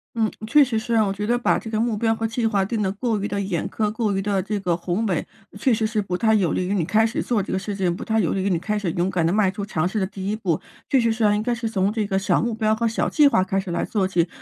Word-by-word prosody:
嗯， 220 -2 +1 0.2
确 290 +6 +6
实 240 -5 0
是 230 +1 -2
啊。 220 -1 +4
我 195 - -1
觉 205 +1 -4
得 240 +1 +2
把 240 - +1
这 225 - -8
个 215 -1 -1
目 230 -1 +1
标 225 +1 +1
和 225 - -3
计 225 +1 -1
划 200 -3 +1
定 220 +1 -2
得 190 -2 0
过 220 +1 -1
于 205 - -1
地 200 - -2
严 190 -4 -2
苛， 210 -1 -1
过 215 -2 -1
于 195 - 0
地 200 -1 0
这 205 +2 -3
个 175 -3 +1
宏 180 +5 -2
伟 185 -6 -1 0.3
确 260 - +2
实 220 0 +1
是 215 -1 0
不 180 -3 -3
太 220 +2 +3
有 190 -7 +2
利 185 - -1
于 195 - -1
你 185 - +1
开 220 +4 +3
始 225 - -1
做 230 -4 0
这 - - -5
个 190 - 0
事 200 +1 -5
情， 185 -3 0
不 - - -6
太 220 0 +1
有 180 - +1
利 195 - -1
于 195 - 0
你 180 - +2
开 210 +5 -2
始 190 -5 -2
勇 175 +2 0
敢 175 -3 +1
地 165 - +2
迈 200 -1 +2
出 200 - -5
尝 175 -5 -1
试 210 +3 -2
的 190 - 0
第 195 0 -5
一 215 - 0
步。 180 -8 -1 0.3
确 270 - +4
实 230 -1 +2
是 225 0 -1
啊 210 0 +4
应 210 - -1
该 245 - 0
是 230 -1 -3
从 200 -2 +1
这 215 -2 -1
个 190 - 0
小 195 - +1
目 235 0 -1
标 215 -1 +1
和 230 +1 0
小 225 - 0
计 300 -2 +5
划 185 -9 +3
开 195 +1 -1
始 190 -1 -5
来 170 - -1
做 200 -4 0
起。 175 -2 +1
210 Hz, 360 characters per minute, -23 LUFS, 190-225 Hz, 0.3 s, 确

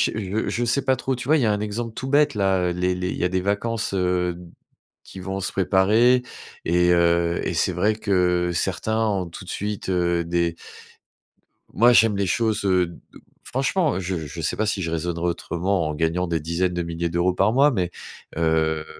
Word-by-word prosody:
je 105 0 -2
je 120 - -1
sais 125 +4 +1
pas 130 - +2
trop. 130 +1 -2
Tu 125 0 -7
vois, 155 +2 +4
il - - +1
y - - +2
a 110 - +3
un 105 - -2
exemple 110 +2 -4
tout 130 +3 -5
bête 145 -1 +3
là, 95 -2 +2
heu, - - -1
les 90 +1 0
les 90 0 -3
il - - -4
y - - -2
a 90 - +2
des 95 0 -1
vacances, 105 +3 -1
heu, 90 -1 0
d 90 +1 -12 0.6
qui 95 - -12
vont 95 +1 -4
se 95 - -2
préparer 105 +7 +3 0.4
et 90 +1 +2
heu, 85 0 +2
et - - -2
c'est - - +1
vrai 110 +1 +1
que 90 -4 +1
certains 110 +6 0
ont 95 -4 -1
tout 85 +3 -10
de - - -8
suite, 105 -1 -4
heu, 85 -2 +1
des 85 0 0 1.2
moi, 120 +6 +5
j'aime 110 -3 +4
les 100 - 0
choses, 110 +2 0
heu, 90 -2 +3
d 85 - -12 0.4
franchement, 140 - 0
je 95 -1 -3
je 80 +4 -7
sais - - -1
pas 110 - 0
si 100 -2 -1
je 80 - -3
raisonnerai 85 +1 -2
autrement 85 +1 -1
en 75 - -3
gagnant 85 +3 0
des 85 -1 -1
dizaines 85 +4 -1
de 90 - -1
milliers 85 0 -3
d'euros 85 +2 +1
par 95 +4 +2
mois, 140 +3 +5
mais, 90 -8 -1 0.5
heu, 80 -1 +1
95 Hz, 215 wpm, -23 LUFS, 85-110 Hz, 1.2 s, moi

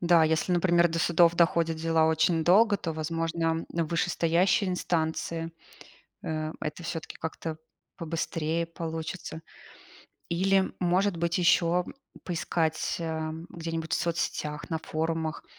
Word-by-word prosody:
Да, 170 -2 +5
если, 160 +3 +1
например, 175 -1 +4
до 165 +1 -2
судов 170 0 +4
доходят 165 -1 +3
дела 160 0 +2
очень 160 +1 +2
долго, 205 +3 +5
то, 165 -3 -4
возможно, 165 +1 -1
в 170 - -1
вышестоящие 175 +3 +2
инстанции, 165 -1 -2 0.7
э, 155 0 -2
это 155 +3 -5
всё-таки 165 0 -5
как-то 160 0 -5 0.4
побыстрее 165 0 -2
получится. 165 0 -6 0.9
Или, 190 +2 +2
может 180 +1 +2
быть, 170 +1 0
ещё 175 0 +3 0.4
поискать, 165 -2 -1
эм, 160 0 -4
где-нибудь 165 -1 -5
в - - +4
соцсетях, 150 -3 -2
на 160 - 0
форумах, 160 0 -3
165 Hz, 120 wpm, -28 LUFS, 160-170 Hz, 0.9 s, Да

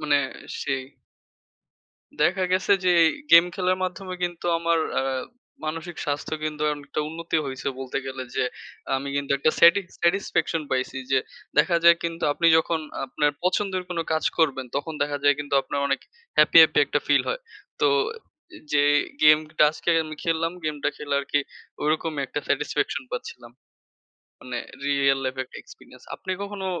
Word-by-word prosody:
মানে 150 -2 +3 0.4
সেই। 135 -2 -2 1.4
দেখা 185 +1 +2
গেছে 190 +2 +2
যে 180 - +4 0.2
ই 160 - +4 0.2
গেম 170 +1 +10
খেলার 185 0 +1
মাধ্যমে 185 +1 -5
কিন্তু 175 -1 -3
আমার 165 0 +1 0.2
অ্যা - - +1 0.6
মানসিক 165 +2 -5
স্বাস্থ্য 145 +1 -2
কিন্তু 150 -1 -3
অনেকটা 145 +1 -5
উন্নতি 165 +1 -3
হইছে 130 0 -4
বলতে 130 0 -3
গেলে 130 -1 -5
যে - - +2 0.5
আমি 135 +1 -4
কিন্তু 140 -1 -3
একটা 155 - +3
স্যাটিকস 175 +2 +5
satisfaction 170 -2 +1
পাইছি। 130 0 -1
যে 135 - +4 0.4
দেখা 170 +3 +4
যায় 170 0 +8
কিন্তু 165 0 -4
আপনি 170 - +1
যখন 160 0 0 0.3
আপনার 150 -11 +1
পছন্দের 185 0 0
কোনো 170 -2 -1
কাজ 160 - 0
করবেন 140 -5 +1
তখন 150 +3 -3
দেখা 145 0 -2
যায় 145 - +6
কিন্তু 145 -1 -3
আপনার 140 - -3
অনেক 140 0 0 0.4
happy, - - +7
happy - - +4
একটা - - 0
feel - - +4
হয়। - - -2 0.4
তো - - +4 0.9
যে 145 -1 +4 0.4
গেমটা 155 0 +5
আজকে 160 - -2
আমি 155 0 -7
খেল্লাম, 165 0 0
গেমটা 150 -1 -1
খেলে 145 -1 -3
আরকি 145 +1 0 0.4
ওইরকমই 155 -1 0
একটা 145 - -4
satisfaction 150 -1 -1
পাচ্ছিলাম। 120 -1 -7 0.9
মানে 125 -1 -6 0.3
Real 140 -1 +3
life 130 0 -3
একটা - - -13
experience. - - -16
আপনি 185 - -5
কখনো 200 -1 -5
155 Hz, 155 wpm, -24 LUFS, 145-170 Hz, 1.4 s, গেম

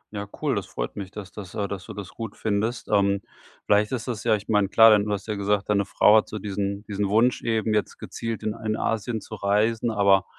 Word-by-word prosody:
Ja, 100 0 -4 0.2
cool. - - +2
Das - - -3
freut - - -5
mich, 100 -2 -6
dass 100 -2 -9
das 100 -4 -9
äh, 100 -1 -1
dass 95 -1 -6
du 110 - -8
das 100 -2 -7
gut 115 0 -7
findest. 110 +3 -1
Ähm, 100 -1 +2 0.4
vielleicht 105 +2 +3
ist 125 -2 -3
das 115 -3 -4
ja 110 -2 +3
ich 105 0 -7
meine, 105 -3 +2
klar, 110 +2 +7
denn 105 -1 +4
du 105 - -3
hast 100 -1 -2
ja 110 - -1
gesagt, 100 0 -1
deine 100 -1 +2
Frau 105 +2 +5
hat 110 - +1
so 110 - -5
diesen 100 0 -3
diesen 100 -1 -2
Wunsch 115 +4 +3
eben 110 -1 0
jetzt 105 - -1
gezielt 115 -1 -5
in 110 -1 -1
ein 110 -1 -3
Asien 115 0 -2
zu - - -11
reisen, 110 +3 +1
aber 100 -3 +3
105 Hz, 245 wpm, -25 LUFS, 100-110 Hz, 0.4 s, klar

